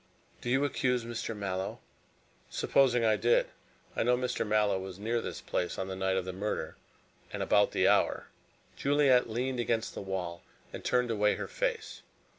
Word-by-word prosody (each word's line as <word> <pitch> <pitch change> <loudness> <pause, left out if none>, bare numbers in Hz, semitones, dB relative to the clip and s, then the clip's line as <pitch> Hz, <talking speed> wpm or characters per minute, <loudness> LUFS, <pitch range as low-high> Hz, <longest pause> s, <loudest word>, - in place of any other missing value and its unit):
"Do 120 - -4
you 135 +3 +3
accuse 125 -4 0
Mr. 115 -1 -4
Mallow?" 95 -1 -3 0.7
"Supposing 125 -4 +3
I 110 -1 +4
did. 120 +3 +3 0.5
I - - 0
know 125 +1 +3
Mr. 125 -3 -1
Mallow 105 -2 +2
was 95 -1 -7
near 115 +3 -1
this - - -6
place 90 -1 -2
on 95 0 -3
the 95 - -4
night 95 0 0
of 95 - -1
the 95 - -4
murder 100 +3 -3 0.6
and - - -3
about - - +4
the - - +2
hour." - - +3 0.5
Juliet 140 -4 +3
leaned 125 +3 -2
against 115 -1 0
the - - -6
wall 90 -3 -4 0.3
and - - -7
turned 125 -1 +1
away 105 -1 +2
her - - -5
face. 475 -4 -3
115 Hz, 175 wpm, -30 LUFS, 95-125 Hz, 0.7 s, I